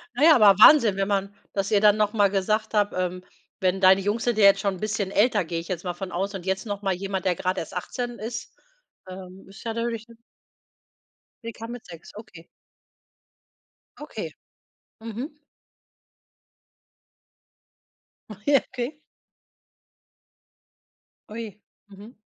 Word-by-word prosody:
Na 265 - 0
ja, 320 0 +8
aber 205 -4 +6
Wahnsinn, 235 -10 +7
wenn 195 0 -1
man 200 -1 -1 0.2
dass 195 -1 -1
ihr 205 -2 +3
dann 210 0 +5
noch 210 -1 +1
mal 205 -3 +3
gesagt 215 +3 -1
habt, 205 -1 +1
ähm, 180 0 -3 0.4
wenn 190 0 +1
deine 190 +1 +6
Jungs 205 +4 -1
sind 240 -3 0
ja 210 - +5
jetzt 195 0 +6
schon 195 -1 -1
'n - - -11
bisschen 210 -2 -2
älter, 210 0 +2
gehe 165 +1 -3
ich 165 - -9
jetzt 180 -2 -4
mal 180 -2 -3
von 185 +1 -7
aus. 195 +4 -3
Und 185 -2 -7
jetzt 190 +1 -2
noch 205 -2 -4
mal 195 -2 0
jemand, 190 0 -4
der 180 -2 +2
gerade 185 +2 -2
erst 165 - -9
18 240 +6 -5
ist. 225 +1 -6 0.5
Ähm, 185 0 -11
ist 195 - -13
ja 230 - -3
natürlich 230 -1 -3
’ne 230 -1 -17 1.3
Sie 230 - -5
kam 230 +2 -8
mit 245 0 -9
6, 165 -2 -13
okay. 175 -6 -12 1.5
Okay. - - -6 0.7
Mhm. 240 +7 -7 2.9
Ach 210 -1 -11
je, 285 -1 +6
okay. 250 +5 -5 2.3
Ui, 215 -2 -7 0.3
mhm. 205 +4 -13
205 Hz, 155 wpm, -25 LUFS, 190-225 Hz, 2.9 s, ja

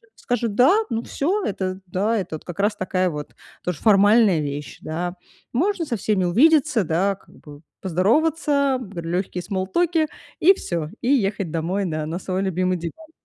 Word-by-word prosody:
скажут 235 -4 -2
"да", 255 - +6 0.2
ну, 230 0 -2
всё- 380 +9 -1
это, 190 -1 -3
да, 200 +3 0
как 170 +3 -8
раз 205 +1 +2
такая 185 -1 0
вот 150 -2 -7 0.3
тоже 180 -4 -3
формальная 205 -3 +5
вещь, 145 0 -5
да. 175 +3 -3 0.4
Можно 345 +6 +1
со 235 -6 -2
всеми 195 -1 0
увидеться, 275 - +4
да, 185 +5 +1
как - - -22
бы 145 0 -13 0.2
поздороваться, 280 - +2 0.2
легкие 175 +2 -2
смоллтоки, 310 - 0 0.3
и 375 +4 +7
всё, 170 - -4
и 245 - -1
ехать 200 - +1
домой 175 +5 -1
на 155 -2 -2
на 165 +4 -4
свой 185 0 -2
любимый 185 -1 0
диван. 305 - -8
195 Hz, 155 wpm, -22 LUFS, 175-250 Hz, 0.4 s, и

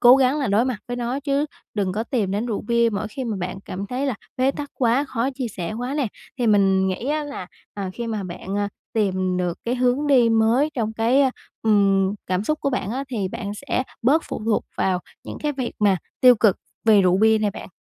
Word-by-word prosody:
cố 245 +1 +8
gắng 270 +2 +3
là 275 - 0
đối 210 +3 +3
mặt 255 -3 -1
với 245 - -3
nó 245 +3 -2
chứ 285 +1 0 0.3
đừng 195 -3 0
có 215 +4 -2
tìm 230 -6 -1
đến 210 +5 -1
rượu 220 -4 -2
bia 235 +1 +2
mỗi 210 +1 -2
khi 260 +4 -5
mà 220 -4 -2
bạn 185 +1 -4
cảm 195 +2 -5
thấy 255 +5 -2
là 265 - 0 0.2
bế 260 +1 +3
tắc 285 +1 -6
quá 250 +2 +2
khó 260 -1 -1
chia 255 -3 -3
sẻ 180 -2 -5
quá 245 +4 -3
nè. 290 -4 +1 0.3
Thì 245 - +1
mình 195 -2 +4
nghĩ 190 +6 -3
á 300 0 0
là, 285 -11 -6 0.3
à, 195 -2 -4
khi 235 +4 -5
mà 215 -3 -2
bạn, 185 +2 -5
à, 205 0 0 0.2
tìm 185 -4 0
được 175 -2 -1
cái 240 +2 0
hướng 255 +3 +1
đi 255 -5 +5
mới 225 +6 +3
trong 220 -3 -1
cái, 230 +5 +3
a, 265 - +3 0.3
ừm, 200 -2 +3
cảm 185 +2 0
xúc 305 +5 -1
của 280 - 0
bạn 250 -6 -2
á 265 +4 -2
thì 210 -7 -2
bạn 200 +1 -5
sẽ 255 +3 -2 0.2
bớt 290 +8 +4
phụ - - -4
thuộc 225 -1 +1
vào 185 -2 +1 0.2
những - - -7
cái 300 -1 0
việc 260 -3 -3
mà 200 -3 +4 0.2
tiêu 250 -1 +8
cực 210 -3 +3 0.3
về 215 -3 +6
rượu 180 0 +3
bia 220 +1 +5
này 210 -1 +1
bạn. - - -9
225 Hz, 240 wpm, -23 LUFS, 200-255 Hz, 0.3 s, cố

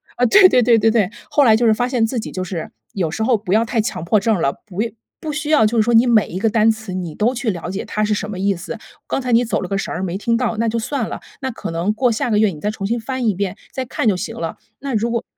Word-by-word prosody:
啊， 245 - +2
对 370 - +7
对 250 - +4
对 230 -1 +5
对 225 +1 +4
对， 215 -4 +1 0.2
后 290 - +4
来 225 -4 +6
就 235 +1 +2
是 220 - +5
发 245 +3 0
现 250 -3 0
自 240 +1 -2
己 220 - -6
就 185 - -4
是， 175 -3 -5 0.2
有 175 -5 -1
时 195 - -4
候 235 0 +3
不 200 -3 -3
要 220 +2 +4
太 230 0 -1
强 210 -7 -4
迫 205 +5 +3
症 210 -3 +1
了。 140 - +1
不 195 -1 -4
要 230 - -1 0.3
不 310 - -4
需 295 0 -4
要 300 -8 +5
就 225 +2 +1
是 - - +5
说， 235 +2 +1
你 230 +2 +6
每 230 -4 +4
一 180 - -6
个 220 +4 +1
单 220 0 +3
词 220 -3 -3
你 175 -4 -4
都 230 +4 +1
去 245 -2 -2
了 175 -2 -6
解 190 +2 -4
它 215 - -2
是 210 0 +1
什 210 0 -3
么 205 - -5
意 200 +2 +1
思。 180 +6 -6 0.3
刚 - - -1
才 250 -1 -3
你 235 +1 +4
走 235 - -1
了 185 - -5
个 195 - 0
神 195 - -3
儿， 185 - -3
没 185 0 -2
听 230 +3 0
到， 230 -2 -1
那 230 +1 +1
就 225 +1 -1
算 230 +1 -2
了。 - - -6 0.2
那 265 - -2
可 225 - -6
能 170 +5 0
过 245 +2 +2
下 225 +2 -1
个 215 - +2
月 215 0 +4
你 160 -5 -8
再 205 - -1
重 210 -2 -4
新 235 +4 -1
翻 255 +2 -3
一 215 - +3
遍， 190 0 -3 0.2
再 260 - -3
看 250 - -3
就 205 -4 +3
行 - - -5
了。 165 -1 -4 0.2
那 275 -1 -4
如 225 +1 0
果 235 -1 -1
220 Hz, 345 characters per minute, -19 LUFS, 195-240 Hz, 0.3 s, 对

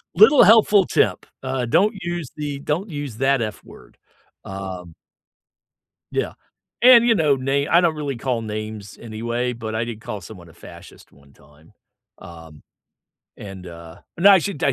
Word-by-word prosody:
little 325 - +7
helpful 210 -3 +5
tip. 100 -6 0 0.2
Uh, 130 -1 -2
don't 200 - +2
use 175 -4 -5
the 145 -2 -5
don't 170 +8 -3
use 145 -7 -6
that 135 -1 +1
f 110 -2 -5
word, - - -17 0.5
um 95 -3 -8 1.2
Yeah, - - -2 0.5
and, 240 -1 +7
you 230 - +4
know, 150 -6 +2
na 135 +2 -1
I 170 - +6
don't 165 -3 +1
really 140 -4 -4
call 120 -1 -2
names 110 -1 -7
anyway, 120 +2 -3
but 110 -2 -7
I 115 +1 -1
did 115 -2 -8
call 105 -2 -6
someone 90 -2 -13
a - - -18
fascist - - -15
one 70 0 -23
time, 75 +3 -23 0.5
um, 80 -3 -13 0.7
and, 95 -2 -10
uh 85 -1 -12 0.2
No, 200 +4 +6
I 195 - +7
should, 195 -3 -5
I 140 - +2
120 Hz, 165 wpm, -21 LUFS, 100-155 Hz, 1.2 s, little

